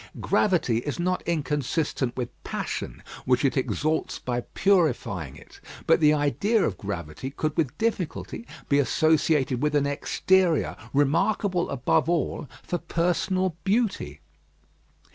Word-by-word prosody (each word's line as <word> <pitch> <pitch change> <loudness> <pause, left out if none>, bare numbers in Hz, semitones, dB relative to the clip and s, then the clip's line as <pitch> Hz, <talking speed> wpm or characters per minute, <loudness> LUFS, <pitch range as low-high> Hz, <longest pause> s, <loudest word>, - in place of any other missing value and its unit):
Gravity 170 - +2
is 145 +7 -4
not 180 +1 0
inconsistent 150 -4 -1
with 125 -2 -2
passion, - - -4 0.2
which 125 +2 +2
it 135 - +2
exalts 155 +3 -1
by 125 -1 -2
purifying 120 - +1
it; - - -15 0.3
but - - +4
the 150 -2 +5
idea 155 +9 +2
of 95 - -1
gravity 95 +3 -5
could 155 +2 -3
with 150 -3 -1
difficulty 225 +1 -3 0.2
be 140 - +3
associated 145 -1 +2
with 150 0 +1
an 145 -1 +3
exterior 170 +4 +1 0.2
remarkable 175 +6 +1
above 150 +5 +1
all 160 -4 -1
for 175 - -2
personal 180 +2 0
beauty. 195 - 0
150 Hz, 125 wpm, -26 LUFS, 130-175 Hz, 0.3 s, the